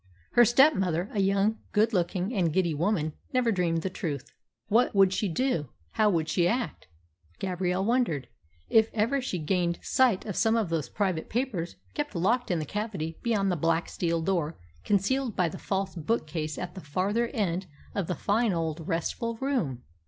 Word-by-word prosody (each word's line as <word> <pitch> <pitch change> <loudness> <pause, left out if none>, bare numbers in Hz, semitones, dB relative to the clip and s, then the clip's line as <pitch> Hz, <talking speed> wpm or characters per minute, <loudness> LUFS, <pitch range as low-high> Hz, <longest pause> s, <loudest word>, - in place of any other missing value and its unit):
Her 240 - +7
stepmother, 205 - +3
a 210 - -1
young, 200 +3 +2
good 220 +2 +3
looking, 180 +3 0
and 180 -7 +1
giddy 175 -1 +1
woman, 155 -1 0 0.2
never 250 -2 +3
dreamed 170 -4 0
the 190 - -1
truth. 145 -8 -4 0.4
What 225 +1 +3
would 195 -1 +5
she 205 - 0
do, 170 - 0 0.2
how 215 -1 +3
would 165 -5 +1
she 170 +2 +2
act, 240 +6 -2 0.5
Gabrielle 185 0 -1
wondered, 220 - +1 0.4
if 220 0 +4
ever 230 +6 +1
she 250 -8 -2
gained 170 +1 0
sight 250 -7 +2
of 205 -4 -4
some 225 0 +3
of 220 -6 +1
those 165 -3 -1
private 185 -6 -1
papers 220 -9 -2 0.2
kept 295 -7 -3
locked 235 +8 +1
in 175 - +1
the 155 - -2
cavity 190 -4 -4
beyond 205 -5 +1
the - - +1
black 165 +1 +1
steel 165 -2 -1
door 170 -3 0 0.3
concealed 220 +4 +1
by 180 -3 +2
the 160 - -6
false 195 -1 -2
bookcase 155 -4 -2
at 180 -1 -5
the 190 - -8
farther 195 +10 0
end 190 -7 -1 0.3
of 195 -5 -2
the 180 - -1
fine 210 +5 +1
old 165 -1 -3
restful 230 +7 -2
room? 225 - -1
190 Hz, 175 wpm, -28 LUFS, 165-225 Hz, 0.5 s, Her